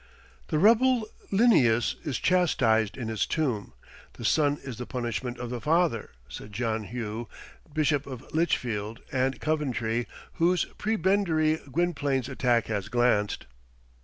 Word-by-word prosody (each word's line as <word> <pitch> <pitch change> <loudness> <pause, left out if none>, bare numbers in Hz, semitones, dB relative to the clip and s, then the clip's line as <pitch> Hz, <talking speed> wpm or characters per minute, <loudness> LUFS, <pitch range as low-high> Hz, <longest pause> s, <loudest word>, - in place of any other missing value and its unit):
"The 155 - 0
rebel 230 +5 +4 0.2
Linnæus 140 - +4
is 145 -7 -2
chastised 110 - +2
in 120 -4 -4
his 110 -3 -1
tomb. 125 - -1 0.4
The - - -8
son 145 -2 +3
is 130 -4 -7
the 125 - -5
punishment 120 0 -3
of 120 -1 -5
the 120 -2 -4
father," 160 -7 +1 0.2
said 65 - -9
John 110 -1 -1
Hough, 115 0 -5 0.4
Bishop 145 -2 +1
of 130 -4 -9
Lichfield 115 -9 -1
and 130 0 0
Coventry, 120 -7 -1 0.3
whose 175 +2 +3
prebendary 190 -7 +2
Gwynplaine's 145 -5 0
attack 120 -3 +1
had 105 -2 -3
glanced. 120 -3 +1
130 Hz, 130 wpm, -27 LUFS, 115-160 Hz, 0.4 s, rebel